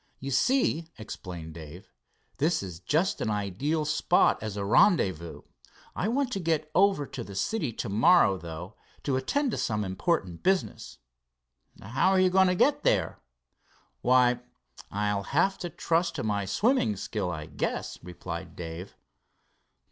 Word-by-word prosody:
You 135 +1 -5
see," 165 - +2
explained 90 -6 -8
Dave, 80 +2 -11 0.4
"this 155 - +1
is 90 -4 -7
just 165 - 0
an - - 0
ideal 105 - -1
spot 150 0 +3
as 105 -1 -5
a 100 - -2
rendezvous. 95 - +2 0.5
I 190 - -1
want 255 +2 0
to 195 - -2
get 160 -3 -1
over 195 -5 +3
to 125 - -7
the 100 -3 -10
city 155 - -1
tomorrow, 110 - +3
though, 85 +4 -8 0.3
to 140 - 0
attend 260 - 0
to - - -3
some 105 -2 -1
important 95 - -1
business." 190 0 -1 0.8
"How 130 - +1
are 190 -1 +3
you 185 0 +4
going 190 0 +5
to 180 - +2
get 290 +9 +3
there?" - - +1 0.8
"Why, 125 -1 +4 0.5
I'll 105 0 -1
have 170 - +1
to 175 - -4
trust 170 +1 0
to - - -3
my 105 -2 -1
swimming 210 - +2
skill, 100 -1 -3
I 80 -3 -5
guess," - - -4
replied 90 -1 -7
Dave. 85 +2 -7
125 Hz, 150 wpm, -28 LUFS, -, 0.8 s, going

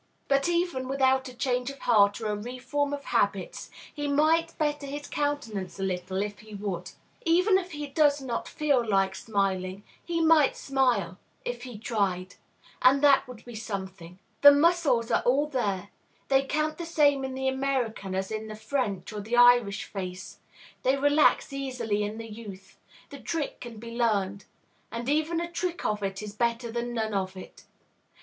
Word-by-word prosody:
But, 275 +3 +2
even 340 -7 0
without 265 0 +2
a - - -11
change 250 0 -1
of 275 - -8
heart 205 -5 +3
or 225 - -6
a 210 - 0
reform 255 +6 -3
of 285 -1 -4
habits, - - -1 0.2
he 290 -1 -3
might 315 +3 +2
better 295 -2 -1
his 290 +1 -5
countenance 245 -13 -3
a - - -2
little, 185 +1 -2
if 205 0 -6
he 215 -1 -11
would. 195 -3 -4 0.3
Even 365 +3 +4
if 365 -2 -8
he 295 0 -4
does 290 0 +3
not 250 -4 -4
feel 285 -5 +1
like 195 -3 +1
smiling, 195 -2 -2 0.2
he 340 -1 -2
might 320 -3 +4
smile, 245 -10 0 0.3
if 245 0 -4
he 245 -3 -8
tried; 195 -5 -1 0.5
and 270 +3 +5
that 280 -2 +5
would 250 -3 -11
be 240 - -9
something. 190 -5 -6 0.2
The 285 - +11
muscles 290 -6 +3
are - - +3
all 270 +4 +2
there; 205 -9 -2 0.4
they 270 0 +3
count 305 +3 -1
the 340 - -4
same 290 -4 +3
in 265 0 -4
the 265 0 -2
American 265 -7 -1
as 190 +1 -2
in 220 0 -4
the 215 - -7
French 215 -4 -2
or 210 - -4
the 225 +4 -2
Irish 245 -4 +5
face; 185 -2 -7 0.4
they 265 +2 +2
relax 290 +1 +3
easily 250 -6 -2
in 210 +2 -3
youth; 210 -4 -10 0.3
the 280 - -8
trick 320 -1 -3
can 235 -2 -8
be 230 +2 -8
learned. 205 -5 0 0.5
And 235 +1 -5
even 310 +3 +1
a 340 0 -4
trick 350 0 -3
of 210 -1 0
it 195 +1 -3
is 210 -1 -7
better 235 +1 -1
than 240 +1 -3
none 220 -2 -1
of 190 -1 -2
it. 185 - -12
245 Hz, 175 wpm, -27 LUFS, 205-285 Hz, 0.5 s, The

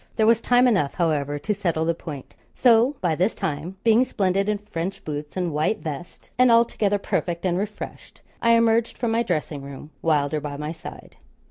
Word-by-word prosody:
There 220 - +2
was 230 +1 +4
time 245 +1 +4
enough, 190 - +1
however, 145 -4 0
to 150 +9 -1
settle 170 -6 -1
the 170 - +2
point. 145 -4 -9 0.2
So 240 +3 +4
by 175 -3 +1
this 185 +7 0
time, 175 0 -4
being 230 +2 +5
splendid 195 -4 0
in 210 - +1
French 195 -2 -5
boots 150 +2 -5
and 175 -4 -1
white 155 +8 +1
vest, 160 -1 -8
and 255 -1 +6
altogether 230 -3 +3
perfect 175 -3 -2
and 175 -2 +1
refreshed, 205 +3 -6 0.2
I 230 0 +4
emerged 230 0 +2
from 235 -2 -1
my 230 +1 +2
dressing 150 -8 -2
room, 140 +2 -10
Wylder 150 -2 +1
by 145 -1 -5
my 150 +1 -4
side. 160 - -10
185 Hz, 190 wpm, -24 LUFS, 150-225 Hz, 0.2 s, and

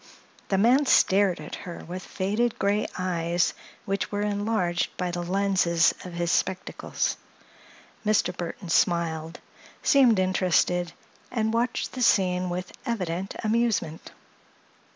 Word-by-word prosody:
The 195 - +2
man 250 +8 +4
stared 195 -5 +4
at 150 - -9
her 175 -2 -7
with 180 +2 -6
faded 210 +6 -1
gray 200 +2 +1
eyes 175 -2 0 0.3
which 195 0 -2
were 205 0 -1
enlarged 205 -4 0
by 180 -1 -2
the 175 0 -3
lenses 180 -2 +2
of 180 - -8
his 170 0 -1
spectacles. 185 0 -1 0.9
Mr. 210 -4 +1
Burthon 175 0 -6
smiled, 165 -1 +1 0.4
seemed 255 -7 +5
interested, 180 -2 +1 0.4
and 220 -2 -1
watched 240 +2 -1
the 255 - -6
scene 185 -5 +3
with 180 +1 -5
evident 190 -6 -3
amusement. 220 -8 0
185 Hz, 120 wpm, -26 LUFS, 175-210 Hz, 0.9 s, seemed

